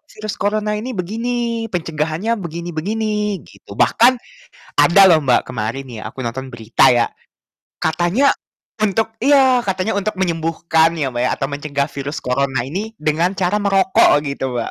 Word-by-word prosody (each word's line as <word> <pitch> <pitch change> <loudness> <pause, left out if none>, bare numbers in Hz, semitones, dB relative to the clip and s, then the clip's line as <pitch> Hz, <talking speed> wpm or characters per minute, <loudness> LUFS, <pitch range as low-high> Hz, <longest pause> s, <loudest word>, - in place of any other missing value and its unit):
virus 215 -1 -5
corona 210 +1 0
ini 250 +4 -5
begini, 230 +4 -2
pencegahannya 165 +4 -2
begini 170 +1 -6
-begini." 210 +3 -2
Gitu - - -17
bahkan 245 +3 +4 0.6
ada 175 +3 +6
loh, 160 - +6
Mbak, 125 -3 +2
kemarin 125 +2 -4
ya 115 - -7
aku 130 - -8
nonton 130 +3 -4
berita 120 +2 +3
ya, 120 -1 +3 0.7
katanya 175 - +2 0.5
untuk 220 +2 0
iya, 265 -2 +4
katanya 190 +2 -1
untuk 200 +1 -1
menyembuhkan 165 -1 +1
ya, 140 - 0
Mbak, 120 -1 -3
ya - - +1
atau 135 - -1
mencegah 140 -1 -2
virus 140 +2 -5
corona 130 0 -1
ini 205 +8 -4
dengan 160 +4 +1
cara 190 +1 0
merokok 195 -1 +4 0.2
gitu, 140 -1 -4 0.2
Mbak. - - -4
175 Hz, 150 wpm, -18 LUFS, 140-215 Hz, 0.7 s, ada